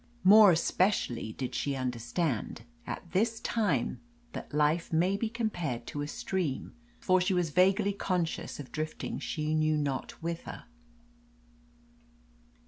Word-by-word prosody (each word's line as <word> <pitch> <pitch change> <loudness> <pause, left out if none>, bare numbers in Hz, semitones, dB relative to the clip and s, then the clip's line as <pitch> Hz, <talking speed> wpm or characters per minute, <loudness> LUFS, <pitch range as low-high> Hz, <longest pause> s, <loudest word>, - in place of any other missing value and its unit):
More 210 +2 +9
especially 165 - +1
did 130 +1 -4
she 140 -1 -1
understand 125 - -2 0.2
at 170 - -6
this 225 +5 +1
time 225 -3 0 0.3
that - - -7
life 150 +3 +1
may 175 +4 +2
be 220 +2 -1
compared 175 - -2
to 145 - -5
a 145 - -3
stream, 160 -2 -3 0.3
for 185 -1 +3
she 185 +1 +1
was 175 -3 0
vaguely 195 +4 +3
conscious 180 -7 -2
of 140 - -8
drifting 155 0 -4
she 155 -1 -2
knew 155 0 +2
not 140 -3 -2
whither. 165 0 -6
165 Hz, 130 wpm, -30 LUFS, 145-190 Hz, 0.3 s, More